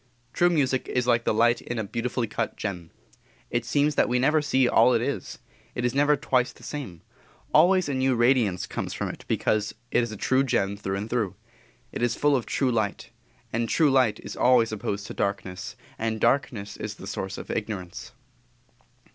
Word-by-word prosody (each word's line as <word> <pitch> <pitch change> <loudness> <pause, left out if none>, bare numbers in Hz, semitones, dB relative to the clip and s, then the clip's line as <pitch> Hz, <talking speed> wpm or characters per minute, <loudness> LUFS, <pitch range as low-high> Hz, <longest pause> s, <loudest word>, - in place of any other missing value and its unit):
True 175 - +4
music 135 -6 +1
is 125 -1 0
like 120 -1 +2
the - - +2
light 120 +2 +3
in 120 - -5
a 110 - -1
beautifully 120 +3 -2
cut 110 0 -3
gem, 90 -5 -5 0.6
it 120 0 -1
seems 145 +4 +2
that - - +2
we 125 - +2
never 150 +5 +3
see 135 -3 +2
all 120 +1 +5
it 115 - +2
is 140 +2 -4 0.4
it 120 - -1
is 120 - +1
never 145 +2 +4
twice 130 -2 +1
the - - -18
same; 115 - -7 0.5
always 185 -1 +5
a 140 - -2
new 130 -1 +2
radiance 120 -6 +2
comes - - -5
from - - -3
it - - -9
because 105 0 0 0.2
it - - +3
is 120 -2 -3
a 110 - -7
true 130 +6 +2
gem 110 -6 0
through 95 -1 -3
and 105 +2 -4
through. 110 -7 -1 0.6
It - - -5
is 120 -1 +1
full 145 -1 +3
of 125 - -2
true 130 -2 +1
light, 110 -4 -2 0.4
and 115 0 -1
true 155 -4 +3
light 130 -5 +3
is - - -7
always 120 -3 +4
opposed 100 -1 -3
to - - -7
darkness; 100 +1 -3 0.2
and 110 0 -1
darkness 105 -6 0
is 105 -1 -5
the - - -11
source 95 -1 -4
of - - -7
ignorance. 100 -5 -5
120 Hz, 195 wpm, -26 LUFS, 105-130 Hz, 0.6 s, all